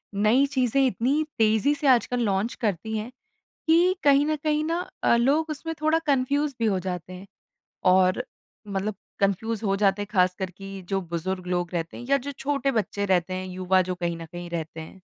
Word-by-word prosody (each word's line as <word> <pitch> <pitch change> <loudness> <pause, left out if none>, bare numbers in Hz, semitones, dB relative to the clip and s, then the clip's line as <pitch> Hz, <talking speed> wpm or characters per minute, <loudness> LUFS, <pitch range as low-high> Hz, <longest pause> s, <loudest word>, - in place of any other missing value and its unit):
नई 215 +7 +4
चीज़ें 270 -1 +2
इतनी 260 +6 +1
तेज़ी 220 +5 +3
से 290 - -2
आजकल 245 -1 +3
लॉन्च 200 +3 0
करती 220 0 -1
हैं, 215 +3 -5 0.6
कि 340 +3 +4
कहीं 285 0 +5
न 310 0 +1
कहीं 305 0 +1
ना 335 +2 -1 0.2
अ, - - +4
लोग 290 +7 +2
उसमें 325 +2 -4
थोड़ा 310 +1 +3
कन्फ्यूज़ 280 +1 +1
भी 230 - +1
हो 195 -3 +2
जाते 180 -1 -5
हैं? 185 +2 -10 0.6
और 185 +5 +4 0.4
मतलब 200 +1 -2 0.3
कन्फ्यूज़ 215 +3 0
हो 195 -1 +1
जाते 200 0 +2
हैं - - -5
ख़ासकर 185 -1 +1
कि 195 +1 -9
जो 195 -1 0
बुज़ुर्ग 185 +2 -3
लोग 175 -1 -1
रहते 165 -1 -3
हैं 240 - -8
या 275 - +6
जो 280 +1 -5
छोटे 275 0 -1
बच्चे 205 -3 -1
रहते 185 -1 +1
हैं, 185 0 -4
युवा 185 0 +1
जो 185 0 -3
कहीं 175 -1 -2
न 165 0 -8
कहीं 175 +1 -8
रहते 165 -1 -5
हैं? 175 +4 -11
210 Hz, 195 wpm, -25 LUFS, 185-275 Hz, 0.6 s, या